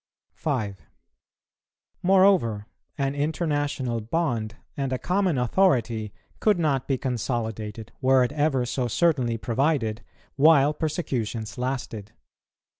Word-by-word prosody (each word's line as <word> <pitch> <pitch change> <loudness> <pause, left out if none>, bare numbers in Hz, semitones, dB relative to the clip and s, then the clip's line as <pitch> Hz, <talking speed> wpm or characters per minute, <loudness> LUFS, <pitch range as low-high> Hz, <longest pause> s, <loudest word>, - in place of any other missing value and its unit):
5. 105 - -3 1.2
Moreover, 185 - +4 0.3
an 135 -1 0
international 145 -5 -1
bond 115 -4 -1 0.2
and 135 -2 -2
a 130 - 0
common 185 0 0
authority 120 - +1 0.3
could 210 -3 +3
not 145 -6 0
be 135 - +1
consolidated, 110 -4 -3
were 130 -1 +5
it 125 - -1
ever 145 -4 +1
so 125 +1 -1
certainly 125 -4 +1
provided, 120 -2 0 0.3
while 145 0 +5
persecutions 125 - -3
lasted. 125 -5 -4
130 Hz, 105 wpm, -25 LUFS, 115-150 Hz, 1.2 s, were